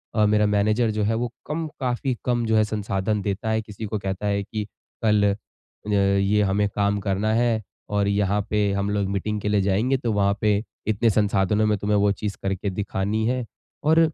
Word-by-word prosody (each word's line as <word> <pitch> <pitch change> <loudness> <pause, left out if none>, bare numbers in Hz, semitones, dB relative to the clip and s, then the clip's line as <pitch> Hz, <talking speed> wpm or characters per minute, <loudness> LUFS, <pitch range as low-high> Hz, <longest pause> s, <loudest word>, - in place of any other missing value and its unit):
अ, 110 -1 +4
मेरा 105 0 +3
मैनेजर 105 +3 +2
जो 105 -1 -1
है 110 +2 +1
वो 120 0 -2 0.2
कम 160 +2 -2
काफ़ी 130 0 -1
कम 120 -2 +1
जो 110 0 +2
है 110 - +5
संसाधन 105 -1 -1
देता 100 +2 -2
है, 110 0 +1
किसी 105 0 -8
को 105 0 -3
कहता 95 +1 -4
है 100 0 0
कि 105 +1 -4 0.4
कल 105 -2 +4
अ, - - -4 0.6
ये 100 +1 +3
हमें 100 +1 +2
काम 100 0 +1
करना 100 +2 0
है 115 -1 +2 0.3
और 100 -1 +2
यहाँ 100 0 +1
पे 105 -1 +1
हम 100 +1 -1
लोग 100 -1 0
मीटिंग 105 +2 -2
के - - -3
लिए 105 -1 +3
जाएँगे 105 +8 +2
तो 120 -3 -2
वहाँ 100 -1 +2
पे 105 - +3 0.4
इतने 110 +2 +2
संसाधनों 105 0 +2
में 105 -1 +2
तुम्हें 105 +1 +1
वो 100 0 +3
चीज़ 100 0 -3
करके 95 +1 -1
दिखानी 100 +2 -1
हैं। 125 -1 -1 0.4
और 160 +2 +4
105 Hz, 205 wpm, -24 LUFS, 100-110 Hz, 0.6 s, है